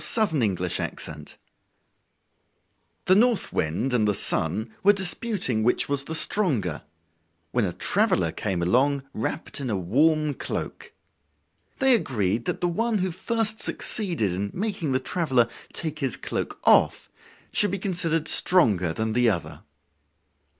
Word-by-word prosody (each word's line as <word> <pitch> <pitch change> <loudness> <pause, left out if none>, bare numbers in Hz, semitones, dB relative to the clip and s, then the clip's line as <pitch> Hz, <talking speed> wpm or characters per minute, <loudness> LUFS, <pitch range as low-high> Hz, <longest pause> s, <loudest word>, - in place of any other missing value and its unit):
Orthographic 145 - +1 0.4
version - - -8 1.8
The 185 - +4
North 230 +2 +2
Wind 90 +12 -1
and 110 -4 +2
the 105 - +1
Sun 110 +9 +1
were 205 +1 +6
disputing 190 - -1
which 120 +3 +2
was 140 -1 -2
the 160 - -5
stronger, 130 - 0 0.7
when 120 -3 +1
a 90 - -3
traveler - - +1
came 90 -3 -3
along 135 +9 +2
wrapped 140 +6 -4
in 130 - -3
a 105 - 0
warm 150 - +2
cloak. - - -6 0.9
They 265 -2 +4
agreed 115 - 0
that - - -3
the 175 - +2
one 225 +6 0
who 185 -1 -1
first 220 +4 -2
succeeded 170 - -1
in 100 +3 -3
making 190 -7 -2
the 130 - +1
traveler 130 -4 +1 0.2
take 155 -2 -3
his 135 -5 -1
cloak - - -4
off - - +3 0.4
should 205 - +4
be 195 - -2
considered 170 -5 -1
stronger 100 - +3
than 110 +4 -2
the 120 0 +3
other. 90 -6 -4
140 Hz, 135 wpm, -25 LUFS, -, 1.8 s, were